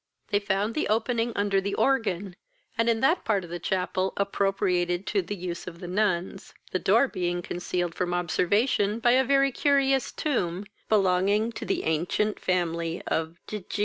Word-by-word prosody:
They 205 - +2
found 205 +2 -1
the 305 - -1
opening 230 +2 0
under 200 -1 +1
the 200 +1 -2
organ, 205 -8 0 0.4
and 230 +1 +2
in 225 -1 +1
that 320 +7 +3
part 205 -4 +1
of 170 - -10
the 175 - -4
chapel 185 +1 -1
appropriated 190 -2 0
to 195 +1 +1
the 185 +3 -5
use 175 -2 -6
of 170 -2 -8
the 175 - -7
nuns, 185 -1 -1 0.2
the 185 - 0
door 225 +9 +4
being 175 -4 -2
concealed 175 -1 -2
from 175 0 -2
observation 200 +5 +1
by 240 +1 +3
a 260 +2 +5
very 275 +1 +3
curious 275 -1 +2
tomb, 195 - -1 0.2
belonging 200 +2 +2
to - - -7
the - - -1
ancient 175 +7 0
family 170 -2 -1
of 160 +1 -1
De 210 - -5
G 200 +2 -7
195 Hz, 175 wpm, -27 LUFS, 175-225 Hz, 0.4 s, a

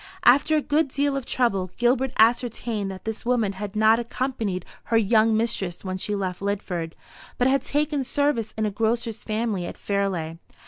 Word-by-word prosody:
After 285 +5 +5
a 300 - 0
good 300 +1 +2
deal 280 +1 0
of 275 -2 -4
trouble, 195 -7 +1
Gilbert 245 +2 +2
ascertained 225 -2 +2
that 190 -1 -8
this 220 0 -4
woman 235 -5 +1
had 200 +1 -6
not 220 +1 +5
accompanied 230 -6 -3 0.2
her 230 - +2
young 220 0 +3
mistress 200 -6 -1
when 185 0 -3
she 210 +2 -1
left 185 -2 -3
Lidford, 185 -5 -3 0.4
but 250 - +3
had 270 0 +3
taken 295 0 0
service 260 -5 0
in 220 - 0
a 210 - -1
grocer's 225 +2 -1
family 215 -5 -2
at - - -8
Fairleigh. 185 -5 -2
225 Hz, 175 wpm, -24 LUFS, 200-250 Hz, 0.4 s, After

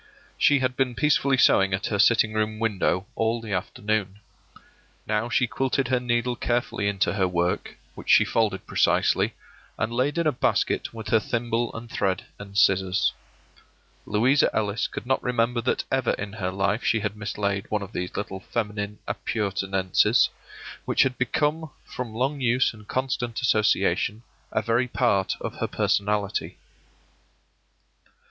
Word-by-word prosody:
She 145 - +4
had 130 -1 0
been 130 -2 0
peacefully 140 -2 +2
sewing 95 -6 +4
at 95 - -5
her 100 - -1
sitting 110 0 +4
room 110 0 -1
window 100 -4 0
all 115 +1 0
the 110 -3 -6
afternoon. 100 +2 -2 0.9
Now 110 +2 -1
she 125 - +2
quilted 130 +1 -1
her 130 -1 +2
needle 120 0 0
carefully 120 -4 -1
into 100 -1 +1
her 95 -2 +1
work, 90 0 -1 0.2
which - - -10
she - - +7
folded 105 -4 0
precisely, - - +2 0.4
and 110 +2 -2
laid 130 +5 0
in 170 - +1
a 155 - +4
basket 125 - 0
with 110 -2 -7
her 110 - +4
thimble 120 +1 -1
and 115 +1 -7
thread 95 -4 -1
and 100 0 -8
scissors. 95 -1 +3 0.9
Louisa 125 +7 +3
Ellis 105 0 0
could - - -7
not 130 +1 +1
remember 120 -1 0
that 125 - 0
ever 130 -2 +1
in 105 0 -5
her 95 -4 -3
life 100 +4 -1
she 110 -1 +2
had 105 0 -2
mislaid 100 -1 -3
one 105 -1 -1
of 100 - -9
these 90 0 -4
little 95 -2 -4
feminine 105 0 -3
appurtenances, 95 -3 +1 0.6
which - - +3
had 130 -1 -1
become, 150 +4 0 0.2
from 120 -3 -6
long 135 +5 -1
use 125 0 +2
and 105 -1 -15
constant 130 -3 -2
association, 110 -1 +1 0.3
a - - 0
very 120 +2 +1
part 115 -6 +1
of - - -5
her - - 0
personality. 105 0 -1
110 Hz, 155 wpm, -25 LUFS, 100-125 Hz, 0.9 s, she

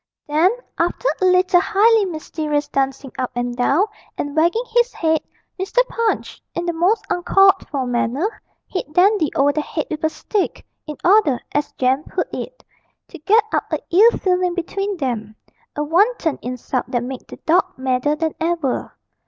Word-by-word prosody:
Then, 310 +5 +4 0.3
after 345 +8 0
a - - +3
little 365 -1 +4
highly 435 +2 +4
mysterious 310 -3 -3
dancing 270 -1 -2
up 255 - -1
and 245 0 -2
down, 275 +10 +2 0.3
and 290 0 -4
wagging 340 +9 +2
his 480 +1 +3
head, 320 -2 +1 0.4
Mr. 385 +6 -5
Punch, 460 -2 -2
in 345 - -2
the 345 - -1
most 360 +7 +1
uncalled 385 +2 +4
for 275 -3 -2
manner, 250 - -1 0.2
hit 365 -5 -5
Dandy 370 -3 +4
over 285 +1 +4
the 305 - 0
head 310 +1 -4
with 310 0 -4
a 315 - +3
stick, 405 +4 -3 0.2
in 300 - -6
order, 365 - +4
as 290 0 -1
Jem 260 +3 +1
put - - -3
it, - - -7 0.5
'to - - -11
get 425 +8 +4
up - - -1
a - - +1
ill 410 +7 +7
feeling 360 -1 +1
between 390 +3 -3
them' 225 -7 -3 0.4
a 295 - -1
wanton 345 - +1
insult 250 +1 -3
that 240 -1 -1
made 255 +1 -7
the - - -10
dog 355 +4 +2
madder 260 +3 0
than 320 0 -2
ever. 325 -5 -2
325 Hz, 170 wpm, -20 LUFS, 275-385 Hz, 0.5 s, ill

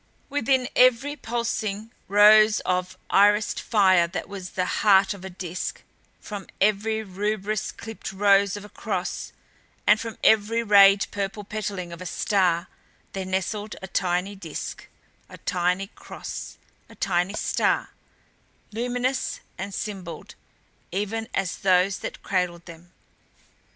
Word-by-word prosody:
Within 265 -2 +1
every 255 +3 +4
pulsing 225 -4 -3 0.2
rose 215 +1 +7
of 180 0 -2
irised 205 +1 +4
fire 190 -6 +4
that 170 - -5
was 195 -2 -8
the 185 - +2 0.2
heart 195 -2 +5
of 195 -2 -12
a 190 - -6
disk, 180 -1 -5 0.4
from 205 -2 -7
every 215 +2 +1
rubrous, 210 +2 -2
clipped 225 -1 -8
rose 200 +1 +3
of 205 - -9
a - - -12
cross, 190 -5 -4 0.5
and 210 +1 +5
from 225 -1 -6
every 220 +2 +4
rayed 200 -2 +6
purple 200 +1 -3
petaling 200 -4 -5
of 170 - -10
a 185 - -5
star 185 -4 +1 0.5
there 190 -1 -4
nestled 200 +3 -2
a - - -5
tiny 180 +2 -1
disk, 165 -6 -7 0.4
a - - -11
tiny 180 +2 0
cross, 200 - -8 0.3
a - - -14
tiny 185 +2 0
star, - - 0 0.8
luminous 245 +3 -2 0.2
and 195 +1 -4
symboled 190 -6 -6 0.6
even 210 +4 -2
as 195 -3 -2
those 185 0 +3
that - - -7
cradled 180 -3 -1
them. 170 +1 -13
200 Hz, 130 wpm, -25 LUFS, 185-215 Hz, 0.8 s, rose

